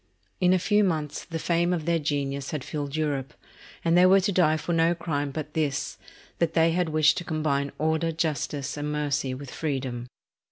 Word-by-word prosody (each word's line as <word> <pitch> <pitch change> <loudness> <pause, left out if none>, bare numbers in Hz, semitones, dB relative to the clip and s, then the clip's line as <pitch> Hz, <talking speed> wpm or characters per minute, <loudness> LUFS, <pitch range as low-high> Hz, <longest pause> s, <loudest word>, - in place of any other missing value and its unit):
In 180 -1 +4
a 185 - +5
few 210 +3 +3
months 155 -6 -1
the 165 - -4
fame 170 +2 +1
of 165 -4 -1
their 170 0 +2
genius 140 -2 -2
had 150 -4 -3
filled 145 -1 -4
Europe; 145 -4 -2 0.5
and 165 0 +4
they 180 +1 +7
were 195 +1 +6
to 200 +2 +1
die 160 -4 +3
for 170 +2 -3
no 165 +1 +3
crime 145 -4 -2
but 150 +1 -6
this, 145 -2 -1 0.4
that 165 -1 0
they 165 0 +4
had 175 0 0
wished 155 0 +4
to - - -6
combine 155 -4 -1
order, 160 +1 +1
justice, 150 -3 -2
and 145 0 -3
mercy 145 -3 -1
with 135 0 -9
freedom." 130 -5 -3
155 Hz, 195 wpm, -26 LUFS, 145-170 Hz, 0.5 s, they